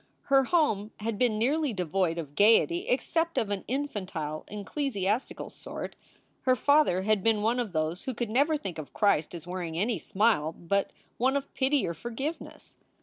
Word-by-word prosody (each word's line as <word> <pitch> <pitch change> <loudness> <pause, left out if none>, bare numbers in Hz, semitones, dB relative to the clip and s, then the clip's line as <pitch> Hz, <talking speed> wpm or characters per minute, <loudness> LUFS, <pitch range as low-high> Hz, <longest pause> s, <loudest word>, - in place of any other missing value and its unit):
Her 270 -1 +6
home 255 - +2
had 220 -1 -2
been 240 -4 +2
nearly 280 +4 +1
devoid 180 -2 0
of 150 -4 -5
gayety 230 - +4
except 335 -8 0
of 210 -3 0
an 200 -2 -2
infantile, 190 - -3
ecclesiastical 210 +1 -2
sort. - - -7 0.5
Her 255 -1 +3
father 285 -10 +3
had 215 -1 +2
been 220 -2 +2
one 235 +3 +2
of 235 -5 -2
those 160 +2 -2
who 260 - -3
could 235 -2 -3
never 290 +6 +3
think 190 - -6
of 150 - -8
Christ 180 -6 +2
as 165 -1 -8
wearing 175 -2 -4
any 215 +6 0
smile 195 -7 +1
but 200 +5 -1 0.3
one 260 +3 +3
of 280 0 -6
pity 270 -2 +1
or 170 - -2
forgiveness. 240 - -6
215 Hz, 170 wpm, -28 LUFS, 185-270 Hz, 0.5 s, Her